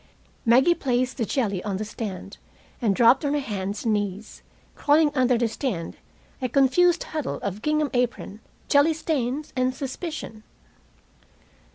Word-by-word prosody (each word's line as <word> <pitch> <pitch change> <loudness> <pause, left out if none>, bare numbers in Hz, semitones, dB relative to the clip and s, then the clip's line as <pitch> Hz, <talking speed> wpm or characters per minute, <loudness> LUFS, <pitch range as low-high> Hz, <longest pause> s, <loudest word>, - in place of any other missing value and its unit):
Maggie 260 +9 +6
placed 255 -5 -1
the 235 - 0
jelly 205 -9 -1
on 200 -2 -2
the 215 - -4
stand, 205 -2 -6 0.4
and 210 -5 +2
dropped 240 - +5
on 285 0 0
her - - +1
hands 205 -5 -4
and 225 - +2
knees, 205 0 -4 0.3
crawling 295 +1 +3
under 255 -3 +3
the 235 0 +1
stand, 215 - -4 0.5
a 255 - -1
confused 320 +7 +3
huddle 305 -4 -4
of 200 +1 -4
gingham 300 +1 0
apron, 245 -4 -2 0.3
jelly 290 +2 +4
stains, 295 -2 -2
and 255 0 0
suspicion. 270 -4 -6
250 Hz, 145 wpm, -24 LUFS, 215-290 Hz, 0.5 s, Maggie